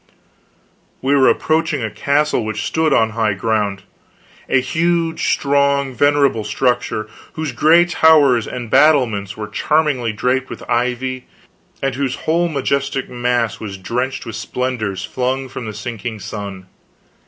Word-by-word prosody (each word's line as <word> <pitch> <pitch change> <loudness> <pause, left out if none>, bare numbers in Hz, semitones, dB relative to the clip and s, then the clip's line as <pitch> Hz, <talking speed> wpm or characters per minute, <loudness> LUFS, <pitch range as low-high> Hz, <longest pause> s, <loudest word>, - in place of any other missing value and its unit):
We 135 +2 +2
were 135 -2 +5
approaching 160 -5 0
a 110 - -3
castle 140 +1 +1
which 110 0 -3
stood 160 +4 +1
on 110 -4 +3
high 110 -2 0
ground; 100 -2 -1 0.7
a 130 - +4
huge, 165 +4 0
strong, 140 -1 +1
venerable 140 -3 +2
structure, 110 0 -1 0.3
whose 155 -3 -3
gray 160 +8 +5
towers 150 -8 +4
and 120 -3 -6
battlements 115 -10 +3
were 105 -1 -5
charmingly 145 -4 0
draped 125 +5 -1
with - - -9
ivy, 125 +1 -1 0.6
and 135 -1 0
whose 130 0 -2
whole 170 +2 +2
majestic 140 -2 -1
mass 120 -2 -1
was 100 -3 -6
drenched 125 +8 -3
with 115 -2 -6
splendors 110 -4 -3
flung 130 +3 -2
from 125 -1 -7
the - - -4
sinking 110 0 -6
sun. 100 -3 -7
125 Hz, 135 wpm, -18 LUFS, 110-140 Hz, 0.7 s, were